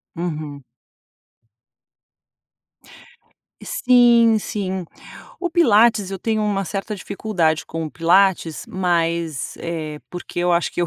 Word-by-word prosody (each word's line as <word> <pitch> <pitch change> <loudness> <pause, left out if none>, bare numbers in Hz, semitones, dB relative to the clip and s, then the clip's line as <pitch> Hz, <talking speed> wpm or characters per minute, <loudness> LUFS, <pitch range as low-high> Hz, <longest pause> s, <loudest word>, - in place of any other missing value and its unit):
Uhum. 155 -4 -5 3.0
Sim 240 - +4
sim, 190 -3 -4 0.6
o 350 -1 -2
pilates 225 - +4
eu 195 - -4
tenho 220 0 0
uma 200 -2 0
certa 195 +3 -4
dificuldade 185 -5 -1
com 165 0 -4
o 155 - -6
pilates. 175 -1 +2
Mas, 170 -4 -1
eh, 160 -3 -5
porque 175 -1 -8
eu 175 0 +2
acho 170 0 +1
que - - -3
eu - - 0
185 Hz, 110 wpm, -21 LUFS, 165-215 Hz, 3.0 s, Sim